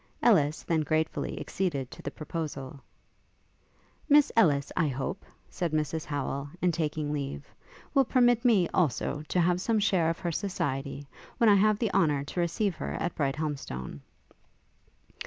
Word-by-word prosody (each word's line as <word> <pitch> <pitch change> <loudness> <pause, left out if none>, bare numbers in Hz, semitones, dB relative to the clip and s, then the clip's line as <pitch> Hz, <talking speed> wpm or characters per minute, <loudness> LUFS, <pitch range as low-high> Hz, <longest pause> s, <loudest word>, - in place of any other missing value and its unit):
Ellis 155 -9 +3
then 165 -2 +1
gratefully 155 +1 -1
acceded 145 -9 -2
to - - -10
the - - -4
proposal. 145 -3 -6 1.3
'Miss 295 0 +6
Ellis, 150 -11 +3
I 170 -4 +2
hope,' 135 +8 -3 0.2
said 170 -3 -3
Mrs 155 +1 -1
Howel, 140 -1 -3
in 180 -1 +2
taking 150 -2 -2
leave, 135 - -4 0.5
'will 270 -1 +4
permit 245 -1 +3
me, 215 -8 +4
also, 150 -3 0
to 180 - 0
have 175 +1 +2
some 225 +2 +1
share 190 -6 +2
of 165 - -2
her 175 - -3
society, 145 -7 -3 0.3
when 230 - +5
I - - +7
have 210 +1 +4
the 220 -2 -1
honour 150 -7 +2
to 145 - -5
receive 175 +3 0
her - - -4
at 175 +1 -2
Brighthelmstone.' 135 - -3
160 Hz, 150 wpm, -28 LUFS, 145-190 Hz, 1.3 s, I